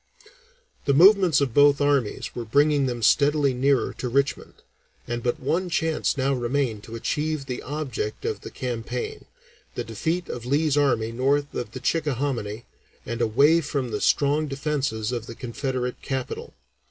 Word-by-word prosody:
The 140 - +3
movements 185 -1 +6
of 135 -5 0
both 145 +1 +5
armies 140 -6 0
were 120 - -4
bringing 145 +4 +3
them 120 -2 -3
steadily 145 +3 +3
nearer 135 +1 +1
to 125 - -2
Richmond, 140 +3 -1 0.5
and 120 0 -3
but 120 0 -1
one 175 +7 -1
chance 160 -3 0
now 135 +1 +1
remained 125 -3 -1
to 115 - -8
achieve 150 +5 -2
the 125 -2 -5
object 135 -7 -4
of - - -2
the - - -8
campaign, 125 0 -5 0.5
the - - -2
defeat 160 - -2
of 120 - -6
Lee's 145 +3 +1
army 125 -6 +2
north 140 +4 0
of 115 -2 -5
the - - -5
Chickahominy 125 -7 -2 0.4
and 115 +1 -4
away 140 +9 +4
from 140 -5 -3
the 105 - -3
strong 150 +2 +2
defences 135 -6 -2
of 120 -2 -4
the 115 - -8
Confederate 125 +1 -3
capital. 130 -2 -5
135 Hz, 155 wpm, -25 LUFS, 120-145 Hz, 0.5 s, movements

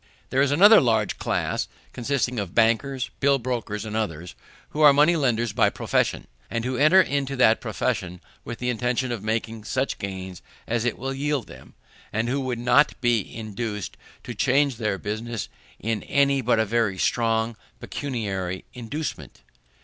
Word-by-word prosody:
_ - - -36 0.3
There 135 - +2
is 140 - +3
another 205 +9 +7
large 110 -4 +1
class, - - -1 0.3
consisting 125 -2 -1
of 100 -4 -5
bankers, 120 +3 +1
bill 140 0 +4
brokers, 115 -4 -3
and 110 0 -5
others, 90 -6 -3 0.4
who 155 - -3
are 150 -1 +9
money 150 +5 +4
lenders 120 -7 0
by - - +4
profession; - - -1 0.2
who 125 +3 -2
enter 155 +8 +6
into 140 -5 +1
that 115 -3 +4
profession 90 0 -2 0.2
with 115 - -6
the 125 0 -1
intention 125 +2 -1
of 115 -4 -4
making 110 0 -2
such 130 +4 -1
gains 95 -2 -6 0.2
as 115 0 -1
it 120 - -1
will 135 +1 -3
yield 145 -1 -1
them, 65 0 -14 0.4
and 110 +2 -1
who 140 +2 0
would 130 -2 -2
not 125 +5 +3
be 120 -3 +2
induced 110 -2 -5 0.3
to - - -6
change 135 -1 +2
their 105 -4 -1
business 110 +2 -4 0.3
by 110 - -5
any 140 +5 +1
but 120 -1 +2
a 110 - +2
very 110 -3 0
strong 115 +2 +1 0.2
pecuniary 100 -9 -4
inducement. 130 +6 -6
120 Hz, 165 wpm, -24 LUFS, 110-135 Hz, 0.4 s, are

